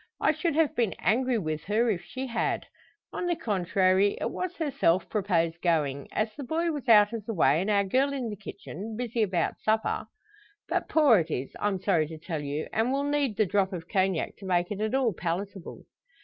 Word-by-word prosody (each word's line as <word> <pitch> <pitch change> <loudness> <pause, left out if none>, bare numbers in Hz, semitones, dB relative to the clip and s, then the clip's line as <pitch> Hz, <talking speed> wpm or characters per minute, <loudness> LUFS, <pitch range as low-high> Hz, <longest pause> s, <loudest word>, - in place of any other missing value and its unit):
I - - +3
should 315 0 -1
have 320 -2 +2
been 225 -7 0
angry 245 +7 +1
with 155 -6 -3
her 225 +3 +2
if 180 -3 -3
she 255 +10 -6
had. 240 -2 -1 0.5
On 355 - -2
the 345 - +1
contrary, 190 - +2
it - - -2
was 365 0 -4
herself 265 - +1
proposed 170 -5 0
going; 145 -5 0
as 215 0 -1
the 285 - -7
boy 330 +6 0
was 285 -5 -5
out 210 -1 +7
of 225 -2 -4
the 225 - -3
way, 155 -1 +4
and 195 - -2
our 200 -1 +3
girl 260 +8 +1
in 255 -5 -3
the - - -4
kitchen, 205 +1 -8
busy 235 -1 -2
about 185 -5 0
supper. 220 0 0 0.6
But - - -1
poor 285 - +5
it 165 0 -2
is 135 -3 -3
I'm 205 -2 0
sorry 175 -5 +2
to 160 +1 -8
tell 160 -1 -4
you 145 +1 -3
and 225 +3 +1
will 275 +1 0
need 285 -6 0
the 215 - +4
drop 195 +1 +1
of 170 -2 -6
Cognac 190 -3 0
to 200 - -11
make 175 0 +1
it 205 0 -3
at 220 +4 0
all 255 -5 +2
palatable." 180 +2 -5
205 Hz, 210 wpm, -28 LUFS, 175-245 Hz, 0.6 s, out